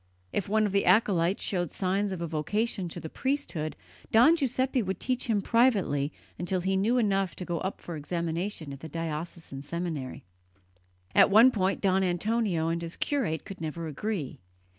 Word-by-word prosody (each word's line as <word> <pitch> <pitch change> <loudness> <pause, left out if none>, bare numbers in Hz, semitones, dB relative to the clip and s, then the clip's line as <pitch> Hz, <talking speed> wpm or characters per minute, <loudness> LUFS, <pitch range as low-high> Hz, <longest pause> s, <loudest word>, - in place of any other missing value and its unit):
If 200 - -1
one 215 +1 +3
of 205 - -1
the 200 -1 +1
acolytes 185 -2 +3
showed 175 -3 -1
signs 195 +2 -1
of 185 -3 -4
a 170 - -2
vocation 185 +5 -1
to 175 - -6
the 160 - -6
priesthood, 230 - -2 0.4
Don 245 +9 +7
Giuseppe 260 -3 +1
would 190 -3 -3
teach 255 -1 -1
him 210 -4 +1
privately 200 - +2 0.3
until 180 +1 -1
he 190 +2 0
knew 215 +6 +2
enough 195 -6 +1
to 180 - -6
go 175 -2 -2
up 190 - -4
for 170 - -6
examination 165 +1 -3
at 135 - -9
the 160 - -8
diocesan 165 -2 -5
seminary. 155 -3 -4 0.9
On - - +7
one 225 +6 +7
point 195 -4 0
Don 190 -1 +3
Antonio 185 -1 0
and 170 0 -1
his 170 0 -6
curate 220 - -1
could 190 -3 -9
never 165 +1 -4
agree. 160 -1 -4
185 Hz, 175 wpm, -28 LUFS, 165-215 Hz, 0.9 s, Don